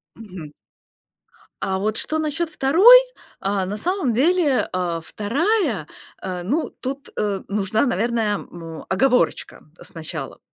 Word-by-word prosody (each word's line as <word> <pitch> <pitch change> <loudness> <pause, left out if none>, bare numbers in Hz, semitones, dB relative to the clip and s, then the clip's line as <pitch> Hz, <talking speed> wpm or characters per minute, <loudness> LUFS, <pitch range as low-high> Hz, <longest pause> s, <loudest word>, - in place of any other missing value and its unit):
Мгм. 180 -9 -10 1.1
А 190 0 -1
вот 215 +2 -1
что 315 +6 -1
насчёт 315 +2 -1
2? 335 - +7 0.4
А 195 -1 -1
на 205 +3 -4
самом 350 - 0
деле, 295 +2 +2
а, 175 -2 -1
2 255 - -1 0.3
а, 180 -2 -4
ну, 295 - -1
тут, 270 0 -5
а, 200 -2 -1
нужна, 205 +4 0
наверное, 225 -2 0
му 165 -2 -9
оговорочка 250 +6 +1 0.2
сначала. - - -7
225 Hz, 120 wpm, -22 LUFS, 190-300 Hz, 1.1 s, 2